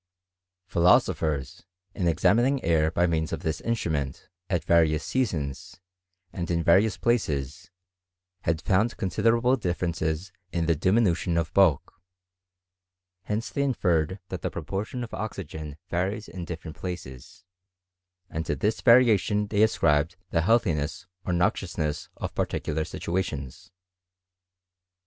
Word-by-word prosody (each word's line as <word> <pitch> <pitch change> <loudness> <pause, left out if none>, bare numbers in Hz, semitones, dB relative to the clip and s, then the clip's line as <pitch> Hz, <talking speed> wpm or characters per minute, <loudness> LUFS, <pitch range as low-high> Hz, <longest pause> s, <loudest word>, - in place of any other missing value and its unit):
Philosophers, 80 -5 +2 0.3
in 90 - -1
examining 115 - +3
air 80 -2 +3
by 85 +2 +2
means 80 -2 0
of - - -3
this 80 - -2
instrument, 80 - -2 0.2
at 90 -4 0
various 80 -2 +3
seasons, 85 - -2 0.5
and 85 -3 -4
in 85 -1 0
various 95 +6 +4
places, 75 - -1 0.7
had 80 -3 -1
found 105 +5 +2
considerable 115 +7 +2
ditTerences 85 -4 -2 0.2
in 85 -2 0
the 85 0 +2
dimi 95 +9 +3
nution 85 0 0
of 80 -2 -3
bulk: 90 -2 +2 1.2
hence 110 +2 -2
they 140 - -1
inferred 95 - +1
that 95 -4 -5
the - - -1
propor 95 +5 -3
tion 125 -1 -5
of 115 - -8
oxygen 80 -8 -6
varies 95 +5 -2
in 85 +1 -7
different 80 -2 -7
places; 85 -6 -8 0.8
and 80 -2 -4
to 75 - 0
this 105 +10 -1
variation 110 -4 +5
they 105 0 0
ascribed 85 -6 +3 0.2
the 85 - +2
healthiness 85 -5 +1 0.2
or - - -1
noxiousness 80 -4 -1
of - - -5
particular 80 +1 -1
situations. 75 -8 -4
85 Hz, 125 wpm, -26 LUFS, 80-105 Hz, 1.2 s, variation